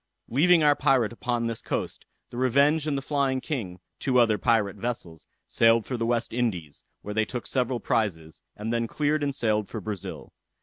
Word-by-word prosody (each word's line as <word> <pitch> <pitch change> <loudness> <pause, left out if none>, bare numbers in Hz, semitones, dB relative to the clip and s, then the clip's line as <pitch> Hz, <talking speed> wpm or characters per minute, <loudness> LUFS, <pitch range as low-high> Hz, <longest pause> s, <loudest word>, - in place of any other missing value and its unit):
Leaving 165 +6 +4
our 145 -1 +5
pirate 130 -6 +2
upon 120 0 -2
this 115 -1 -3
coast, - - -4 0.3
the 120 - -8
Revenge 140 +5 +3
and 145 -2 0
the 135 - -4
Flying 140 -2 0
King, 110 - -4 0.2
two 130 -2 +1
other 110 -4 +4
pirate 105 -2 +1
vessels, 95 -8 -5 0.2
sailed 115 -1 +3
for 130 - -3
the 115 -1 -1
West 120 -1 -1
Indies, 95 -12 -2 0.2
where 105 - -5
they 110 +1 +2
took 120 +1 -5
several 125 -1 -1
prizes, 80 -11 -2
and 110 +2 -4
then 115 0 0
cleared 150 +4 0
and 140 -1 -1
sailed 110 -5 0
for 110 - -5
Brazil. 105 -2 -7
120 Hz, 185 wpm, -26 LUFS, 110-135 Hz, 0.3 s, our